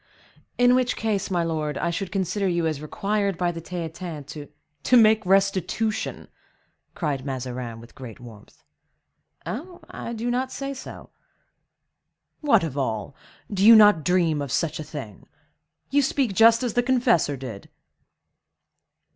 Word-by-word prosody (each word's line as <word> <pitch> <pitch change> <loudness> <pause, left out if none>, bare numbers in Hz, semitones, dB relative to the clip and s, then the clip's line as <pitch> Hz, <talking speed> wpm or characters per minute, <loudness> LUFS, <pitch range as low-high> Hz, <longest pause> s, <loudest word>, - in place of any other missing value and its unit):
"In 245 0 +5
which 255 0 +2
case, 205 -3 -1
my 175 -3 0
lord, 155 -2 -2
I 170 - -1
should 180 +2 -4
consider 195 +1 -1
you 170 -2 0
as 155 -3 -2
required 200 +3 -1
by 175 0 0
the 165 -1 -7
Theatin 165 -2 -6
to—" 145 +1 -9 0.3
"To 250 - +4
make 220 -1 +5
restitution!" 195 +3 0 0.7
cried 145 -6 -2
Mazarin, 125 -3 -5
with 115 +1 -15
great 125 -6 -10
warmth. 115 -4 -15 0.8
"Eh! 235 - -3 0.3
I 235 - -6
do 235 +2 -2
not 255 +2 -1
say 275 0 -5
no." - - -11 1.3
"What, 235 - +3
of 155 -5 -4
all! 110 -1 -3 0.3
You 205 - -6
do 215 +4 +8
not 210 -7 +6
dream 170 -4 +2
of 140 -3 -5
such 165 -2 -1
a - - -4
thing! 140 -10 -9 0.6
You 285 +1 +4
speak 265 -5 0
just 230 +4 +5
as 240 -4 -1
the 245 - +3
confessor 240 - +2
did." 120 -6 -8
180 Hz, 145 wpm, -24 LUFS, 145-220 Hz, 1.3 s, do